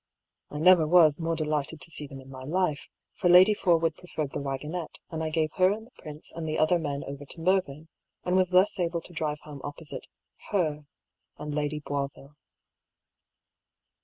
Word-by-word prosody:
I 150 Hz, -, -7 dB
never 165 Hz, 0 st, +6 dB
was 160 Hz, -3 st, +6 dB
more 165 Hz, 0 st, -1 dB
delighted 155 Hz, 0 st, -2 dB
to 165 Hz, -, -8 dB
see 150 Hz, -2 st, -3 dB
them 135 Hz, 0 st, -10 dB
in 130 Hz, -, -14 dB
my 130 Hz, -1 st, -9 dB
life; 155 Hz, 0 st, -1 dB, 0.3 s
for 180 Hz, -, 0 dB
Lady 185 Hz, +4 st, +8 dB
Forwood 165 Hz, -5 st, +2 dB
preferred 155 Hz, -5 st, -5 dB
the -, -, -3 dB
waggonette, 150 Hz, +5 st, -4 dB
and 160 Hz, -1 st, -3 dB
I 160 Hz, -, -1 dB
gave 155 Hz, -1 st, 0 dB
her 185 Hz, 0 st, +5 dB
and 220 Hz, +2 st, -4 dB
the 245 Hz, -, -21 dB
prince 150 Hz, 0 st, -10 dB
and 165 Hz, -1 st, -4 dB
the 155 Hz, -, -1 dB
other 170 Hz, +3 st, +3 dB
men 145 Hz, -3 st, -3 dB
over 140 Hz, +1 st, -7 dB
to 145 Hz, -, -5 dB
Mervyn, 165 Hz, -4 st, 0 dB, 0.4 s
and 180 Hz, -, 0 dB
was 185 Hz, -1 st, +3 dB
thus 185 Hz, +2 st, +3 dB
able 170 Hz, -1 st, 0 dB
to 175 Hz, -, -15 dB
drive 150 Hz, -2 st, -2 dB
home 145 Hz, -2 st, -10 dB
opposite 145 Hz, +1 st, -8 dB, 0.4 s
her 155 Hz, -7 st, -1 dB, 0.5 s
and 150 Hz, 0 st, -5 dB
Lady 150 Hz, 0 st, -2 dB
Boisville. 140 Hz, 0 st, -5 dB
155 Hz, 185 wpm, -28 LUFS, 145-175 Hz, 0.5 s, Lady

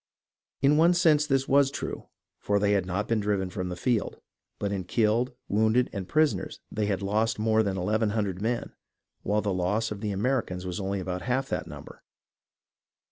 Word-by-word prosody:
In 145 Hz, +2 st, +5 dB
one 170 Hz, +3 st, +5 dB
sense 155 Hz, -4 st, +4 dB
this 135 Hz, -2 st, +1 dB
was 140 Hz, 0 st, +4 dB
true, 140 Hz, -, -5 dB, 0.3 s
for 100 Hz, -, +1 dB
they 100 Hz, 0 st, +2 dB
had 100 Hz, -3 st, +1 dB
not 100 Hz, +4 st, -2 dB
been 115 Hz, -1 st, +1 dB
driven 100 Hz, -3 st, -1 dB
from 90 Hz, -1 st, -3 dB
the 90 Hz, -, -4 dB
field, 115 Hz, +4 st, -1 dB, 0.4 s
but 100 Hz, -1 st, -2 dB
in 95 Hz, -2 st, -2 dB
killed, 115 Hz, +6 st, +1 dB
wounded, 110 Hz, +4 st, +2 dB
and 95 Hz, -4 st, -4 dB
prisoners 155 Hz, 0 st, +1 dB
they 105 Hz, -1 st, -1 dB
had 100 Hz, -1 st, -1 dB
lost 110 Hz, +3 st, +1 dB
more 110 Hz, +1 st, +2 dB
than 100 Hz, -3 st, -1 dB
eleven 105 Hz, +4 st, +1 dB
hundred 100 Hz, -3 st, -2 dB
men, 120 Hz, +2 st, -2 dB, 0.5 s
while 105 Hz, +2 st, 0 dB
the 100 Hz, -2 st, -1 dB
loss 105 Hz, +5 st, 0 dB
of 105 Hz, -1 st, -5 dB
the 105 Hz, -, -2 dB
Americans 100 Hz, -3 st, -1 dB
was 90 Hz, +1 st, -4 dB
only 100 Hz, 0 st, -2 dB
about 90 Hz, 0 st, -4 dB
half 130 Hz, +5 st, -1 dB
that -, -, -2 dB
number. -, -, -11 dB
105 Hz, 190 wpm, -27 LUFS, 95-125 Hz, 0.5 s, In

